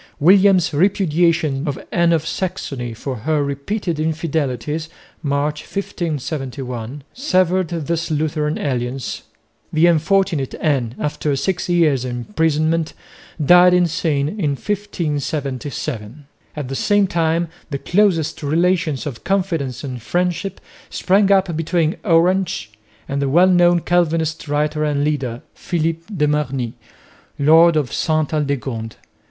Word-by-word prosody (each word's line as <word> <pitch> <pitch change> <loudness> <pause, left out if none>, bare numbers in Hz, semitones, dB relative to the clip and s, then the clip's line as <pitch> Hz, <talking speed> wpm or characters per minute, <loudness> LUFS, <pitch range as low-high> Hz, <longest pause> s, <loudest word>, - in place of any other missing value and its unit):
William's 185 +1 +5
repudiation 165 -4 +2
of 140 - -2
Anne 170 -1 +3
of 160 -2 +1
Saxony 145 -12 -3
for 130 +2 -5
her 150 +6 0
repeated 155 +5 -3
infidelities 155 -2 -2 0.3
(March, 145 +1 -1
1571) 140 - -4
severed 185 - +1
this 165 +1 -2
Lutheran 150 0 -1
alliance. 130 -1 -3 0.5
The 155 +2 +3
unfortunate 170 -3 +2
Anne, 130 -6 0
after 150 -1 -1
six 180 +6 -2
years' 155 -7 +3
imprisonment, 155 +5 0 0.4
died 180 +4 +6
insane 165 -5 +1
in 155 -5 -1
1577. 145 - -4 0.3
At 150 -4 -4
the 135 - -4
same 205 +7 +3
time 170 -2 0 0.2
the 140 - -2
closest 175 -1 +1
relations 160 -1 +1
of 135 -6 -6
confidence 165 -10 -1
and 130 -4 -5
friendship 180 - -2 0.3
sprang 195 +1 +2
up 190 -4 +3
between 165 +2 0
Orange 175 - +2 0.4
and 140 0 -2
the 140 - 0
well 175 +6 +5
known 175 -1 +4
Calvinist 160 -2 0
writer 150 +1 0
and 145 -1 0
leader, 135 -6 -2
Philip 165 -1 -2 0.2
de 150 -1 +2
Marnix, 135 -5 -1 0.6
lord 160 +3 +6
of 145 -5 0
Sainte 155 -1 0
Aldegonde. 135 -7 -2
155 Hz, 115 wpm, -19 LUFS, 140-175 Hz, 0.6 s, died